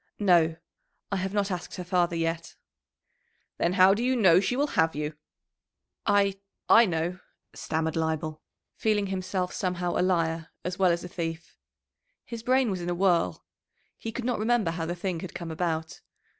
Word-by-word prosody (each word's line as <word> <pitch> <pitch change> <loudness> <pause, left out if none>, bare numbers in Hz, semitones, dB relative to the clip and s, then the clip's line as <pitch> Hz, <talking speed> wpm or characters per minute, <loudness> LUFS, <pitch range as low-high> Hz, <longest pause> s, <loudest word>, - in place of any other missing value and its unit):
"No; 170 -5 +4 0.6
I 200 - 0
have 190 0 -2
not 200 -1 0
asked 180 -3 -5
her 180 - -5
father 175 -1 +1
yet." 165 0 -2 1.0
"Then 175 - +2
how 185 0 +6
do 210 - -2
you 255 +1 +2
know 185 -7 +6
she 200 +6 0
will 285 +2 +1
have 160 -1 +2
you?" 150 +1 -3 0.9
"I 200 -1 +3 0.3
I 230 0 +7
know," 175 +1 -2 0.3
stammered 160 0 -2
Leibel, 160 -1 -2 0.3
feeling 210 -2 +1
himself 185 -1 -2
somehow 180 -2 -1
a - - +2
liar 165 -3 0 0.2
as 180 +1 -3
well 185 -2 +5
as 170 0 -1
a - - -5
thief. 165 -1 -5 0.7
His 235 -1 -7
brain 255 -1 +2
was 185 -2 -3
in 175 - -3
a 175 - 0
whirl; 170 - +1 0.5
he 225 - -6
could 235 +1 -5
not 245 -3 0
remember 220 -5 +2
how 165 -1 -3
the 175 - -2
thing 180 -1 -3
had 185 - -8
come 170 -1 -5
about. 160 -1 -3
180 Hz, 175 wpm, -27 LUFS, 165-200 Hz, 1.0 s, I